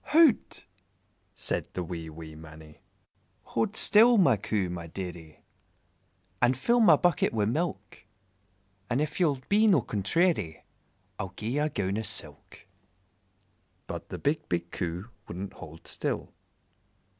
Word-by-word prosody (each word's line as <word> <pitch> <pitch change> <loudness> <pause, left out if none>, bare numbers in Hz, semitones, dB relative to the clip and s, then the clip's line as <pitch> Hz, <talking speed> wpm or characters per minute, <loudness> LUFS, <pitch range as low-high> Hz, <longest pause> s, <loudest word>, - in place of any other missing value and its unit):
"Hout!" 315 -5 +3 0.7
said - - -2
the 90 - -2
wee, 85 -2 -6
wee 80 0 -10
Mannie 80 -1 -13 0.6
"Hold 120 - -1
still, 230 +3 +6
my 140 - +5
Coo, 100 -1 -1
my 85 -1 -6
dearie, 85 -3 -8 1.0
And 125 +1 +3
fill 240 - +2
my 225 - +7
bucket 175 -4 +2
wi' 105 -2 +1
milk, 155 +10 -3 0.9
And 125 +2 +1
if 150 +2 -2
ye 175 - +5
'll 140 -2 0
be 215 +2 +4
no 180 - +5
contrairy 105 - 0 0.6
I'll 95 -1 -5
gi'e 110 - -3
ye 145 - 0
a 150 +1 +1
gown 100 -4 -1
o' - - -1
silk." 110 - -5 1.2
But - - -7
the - - -5
big, 150 +2 -1
big 85 0 -2
Coo 90 +3 -4 0.2
wouldn't 95 +3 -6
hold 80 +1 -12
still. - - -4
105 Hz, 140 wpm, -28 LUFS, -, 1.2 s, my